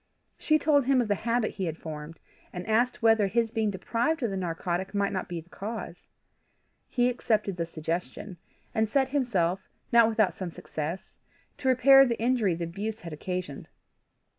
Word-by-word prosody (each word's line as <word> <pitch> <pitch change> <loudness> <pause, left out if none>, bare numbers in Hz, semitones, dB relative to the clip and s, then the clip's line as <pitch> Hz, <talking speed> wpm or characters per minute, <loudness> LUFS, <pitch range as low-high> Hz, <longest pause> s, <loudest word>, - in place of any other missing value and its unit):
She 310 - +3
told 285 -3 +3
him 270 0 +3
of 235 -3 0
the - - +4 0.2
habit 230 -1 +1
he 190 - -4
had 160 -1 -3
formed, 155 0 -8 0.3
and 180 0 -6
asked 235 +3 +1
whether 225 -3 +5
his 230 +2 0
being 220 -2 0
deprived 235 - -1
of 230 - 0
the - - -3
narcotic 180 +2 -3
might 200 0 +1
not 185 - -3
be 175 -1 -4
the 165 - -23
cause. 205 -4 -7 0.8
He 245 0 +1
accepted 215 -5 0
the 170 -1 -3
suggestion, 170 +3 -5 0.4
and 220 -1 +1
set 265 +2 +2
himself, 195 -10 0 0.2
not 235 -1 +6
without 215 -3 +2
some 185 -2 -5
success, 160 +2 -6 0.4
to 275 - -3
repair 270 +1 +7
the 235 -3 0
injury 230 -6 +2
the 170 - -4
abuse 205 +6 -4
had 170 -2 -7
occasioned. 180 -2 -5
205 Hz, 175 wpm, -28 LUFS, 175-235 Hz, 0.8 s, repair